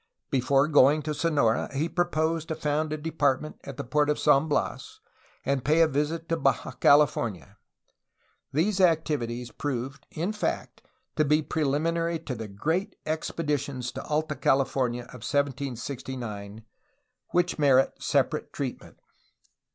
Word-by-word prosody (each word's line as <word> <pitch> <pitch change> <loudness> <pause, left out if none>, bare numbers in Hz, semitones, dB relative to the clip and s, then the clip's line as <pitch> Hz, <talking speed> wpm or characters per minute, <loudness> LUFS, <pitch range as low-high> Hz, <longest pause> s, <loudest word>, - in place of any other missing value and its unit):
Before 135 +2 +3
going 150 0 +5
to 155 0 -2
Sonora 145 -8 +1
he 150 +4 +1
proposed 165 -2 0
to 160 - -2
found 155 0 -1
a 155 - -1
depart 150 -4 +1
ment 155 - -9
at 140 - -8
the - - -3
port 150 +4 +1
of 150 - +2
San 140 +3 +4
Bias 435 - -2 0.5
and 140 -2 0
pay 155 +4 +3
a - - +4
visit 155 +3 -2
to 165 - 0
Baja 135 -4 +1
Cali 145 +1 +6
fornia. 110 -9 -5 0.9
These 190 +7 +1
activities 145 -9 +1
proved 140 +1 -4
in 175 +7 -2
fact 210 - -3 0.4
to 155 - +4
be 150 +1 +2
preliminary 165 +3 0
to 155 -4 -6
the 110 -2 -6
great 160 - -2
expeditions 145 -5 -2
to - - -6
Alta 155 +1 -1
California 130 -3 +1
of 125 0 -12
1769, 125 -6 -3 0.7
which 175 -1 +1
merit 135 -2 +4
separate - - 0
treatment. - - -6
145 Hz, 140 wpm, -27 LUFS, 130-160 Hz, 0.9 s, Cali